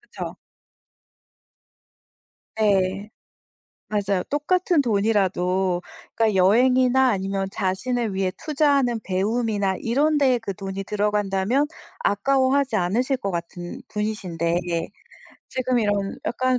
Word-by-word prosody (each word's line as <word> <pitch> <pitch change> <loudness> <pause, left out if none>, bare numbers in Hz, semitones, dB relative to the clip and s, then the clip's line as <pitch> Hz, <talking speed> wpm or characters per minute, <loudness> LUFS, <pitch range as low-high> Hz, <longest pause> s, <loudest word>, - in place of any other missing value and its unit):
그쵸? 420 - -8 2.2
네. 200 0 +1 0.8
맞아요. 200 -3 0
똑같은 345 +3 +2
돈이라도 190 -5 +1 0.3
그러니까 220 -3 +2
여행이나 250 +6 +4
아니면 195 -1 -1
자신을 205 +3 -1
위해 190 -1 0
투자하는 280 -6 +2
배움이나 200 0 0
이런 290 +6 +2
데에 260 -4 +3
그 200 -4 -5
돈이 195 0 -5
들어간다면 210 +5 0 0.4
아까워하지 265 +3 +2
않으실 240 +9 +1
것 200 - -3
같은 175 +5 -6
분이신데 180 -6 -2
예 165 -1 -1 0.6
지금 255 -1 0
이런 205 -2 -1
약간 255 +1 +1
210 Hz, 255 characters per minute, -23 LUFS, 190-255 Hz, 2.2 s, 여행이나